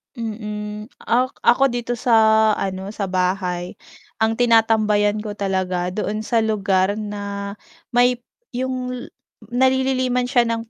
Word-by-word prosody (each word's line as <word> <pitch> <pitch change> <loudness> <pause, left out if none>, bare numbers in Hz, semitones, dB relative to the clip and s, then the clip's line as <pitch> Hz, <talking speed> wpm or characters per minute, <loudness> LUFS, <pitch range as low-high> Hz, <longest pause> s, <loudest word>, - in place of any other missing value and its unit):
Mm. 210 -1 -6
Ak 255 +2 0
ako 265 +1 +4
dito 240 0 -2
sa 240 0 +1 0.4
ano, 190 +1 -4
sa 200 -3 -3
bahay 180 -1 -1 0.5
ang 225 0 +2
tinatambayan 215 -3 +3
ko 210 -1 -5
talaga 185 -3 -1
doon 210 +2 -3
sa 230 +2 0
lugar 200 -3 +2
na 200 -1 -5 0.3
may 245 0 +3 0.3
'yong 255 0 -2
ay 245 -1 -7 0.4
nalililiman 255 0 +1
siya 245 -2 +3
ng 230 0 -3
220 Hz, 125 wpm, -21 LUFS, 200-245 Hz, 0.5 s, ako